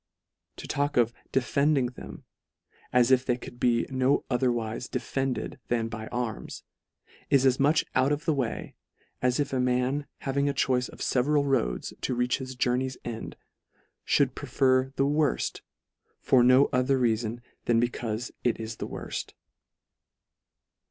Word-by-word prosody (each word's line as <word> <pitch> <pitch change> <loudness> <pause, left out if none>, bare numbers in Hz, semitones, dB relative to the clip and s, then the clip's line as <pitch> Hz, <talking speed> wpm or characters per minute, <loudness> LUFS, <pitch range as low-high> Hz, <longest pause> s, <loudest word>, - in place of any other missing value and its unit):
To - - -9
talk 145 -1 -1
of 120 -1 +3
" - - -37
defending 140 +1 +2
" 125 - -5
them, - - -10 0.7
as 125 0 +4
if 130 -1 +5
they 125 -2 0
could 120 -1 -11
be 120 -2 +2
no 130 +1 +2
otherwife 120 -2 -1
"defended" 135 -2 -3
than 115 -1 0
by 110 -1 -6
arms, 120 -3 -4 0.7
is 135 -1 +4
as 130 -1 +3
much 145 +3 +3
out 130 +2 +3
of 150 +2 -1
the 160 - +2
way, 130 -5 -3 0.5
as 125 +1 +1
if 140 -2 -1
a 130 - +1
man 125 +3 0
having 140 +1 0
a - - 0
choice 125 -2 +1
of - - -12
feveral 140 +3 +2
roads 130 - 0
to 125 - -1
reach 125 +2 +1
his 130 -1 -6
journey's 125 +1 0
end, 115 -2 -6 0.7
fhould 135 -3 +2
prefer 130 -1 +1
the 135 - +2
worft, 145 0 0 0.6
for 125 -2 +4
no 130 +3 +6
other 130 +2 +2
reafon, 115 -1 0 0.3
than 115 -1 +3
becaufe 120 -1 -2
it 120 - +1
is 110 0 -5
the - - -4
worft. - - -6
125 Hz, 155 wpm, -27 LUFS, 120-135 Hz, 0.7 s, no